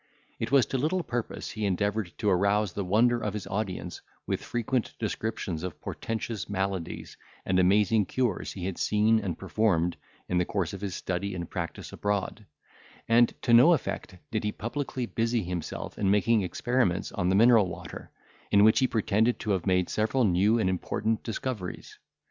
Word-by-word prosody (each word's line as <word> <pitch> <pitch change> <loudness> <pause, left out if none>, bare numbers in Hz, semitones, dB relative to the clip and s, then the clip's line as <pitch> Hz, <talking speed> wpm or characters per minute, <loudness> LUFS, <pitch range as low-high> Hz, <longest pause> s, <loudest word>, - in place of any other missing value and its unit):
It 115 - -3
was 140 -3 +5
to 135 - -2
little 170 +6 0
purpose 120 -5 -4
he 110 - -5
endeavoured 100 0 0
to 105 - -2
arouse 100 +1 +2
the 100 - -2
wonder 115 +6 +3
of 105 -1 -2
his 105 - -4
audience 95 -4 -4 0.2
with - - -2
frequent 120 0 -2
descriptions 110 -7 -3
of 90 -1 -6
portentous 110 -4 -4
maladies 95 -3 -3 0.3
and 95 -1 +2
amazing 100 +3 +3
cures 125 -7 -1
he 90 -3 -5
had 95 -1 -4
seen 110 +1 +3
and 95 -6 -3
performed 90 -6 +1 0.3
in 90 - +1
the 90 - +1
course 95 -3 -2
of 100 - -7
his 100 -3 -3
study 95 +1 -3
and 85 -2 -6
practice 85 -2 -5
abroad; 105 +1 -2 0.6
and 115 +1 +4
to 120 - +2
no 125 +9 +8
effect 105 - -3
did 110 - -1
he 105 - 0
publicly 125 +2 -4
busy 115 -1 0
himself 90 -2 -5
in 100 - +2
making 105 +2 +3
experiments 100 0 0
on 90 -2 -1
the 95 - +3
mineral 115 -1 +6
water, 90 - -8 0.4
in 100 0 +5
which 110 +1 +6
he 130 - +3
pretended 110 +1 +1
to 105 - -2
have 95 -1 -1
made 90 -1 +2
several 110 +4 +1
new 100 +3 +3
and 110 - +1
important 105 +4 -1
discoveries. 110 -5 -5
105 Hz, 175 wpm, -28 LUFS, 95-115 Hz, 0.6 s, no